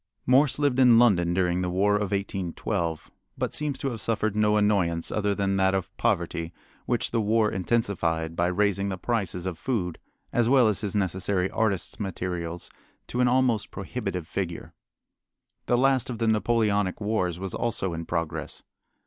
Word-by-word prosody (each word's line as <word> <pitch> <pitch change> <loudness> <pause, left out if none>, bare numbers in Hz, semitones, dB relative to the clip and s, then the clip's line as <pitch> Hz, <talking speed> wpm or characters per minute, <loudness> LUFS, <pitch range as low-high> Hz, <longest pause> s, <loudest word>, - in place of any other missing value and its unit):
Morse 135 +1 +4
lived 145 -3 +1
in 125 -3 +7
London 95 -8 +4
during 90 0 +1
the 90 - -1
War 100 +3 +2
of 105 -1 0
1812, 95 -3 -3 0.3
but - - -2
seems 150 -2 0
to 135 0 -2
have 115 -2 -6
suffered 110 -1 0
no 105 0 +3
annoyance 95 -6 +1
other 105 -1 0
than 100 -1 0
that 95 0 +3
of 95 0 -4
poverty, 85 -6 -1 0.4
which 120 - 0
the 115 - +1
war 110 +1 +2
intensified 85 -6 -1
by 85 +1 +1
raising 100 +1 +1
the 95 - -3
prices 95 -4 -2
of 90 -3 -4
food 90 -10 -2 0.3
as 120 -1 +2
well 130 -3 +5
as 105 -2 0
his 105 -1 -3
necessary 95 -1 0
artist's 110 -1 -1
materials 90 -4 -4 0.3
to 125 - -2
an 125 - +4
almost 125 -4 +2
prohibitive 95 -5 -5
figure. 90 -4 -4 0.9
The 120 - +3
last 130 -1 +2
of 120 - -4
the 115 0 0
Napoleonic 105 -3 +1
wars 100 -5 -1
was 95 0 -5
also 100 -6 -1
in 85 0 -5
progress. 85 -2 -3
100 Hz, 165 wpm, -26 LUFS, 90-115 Hz, 0.9 s, in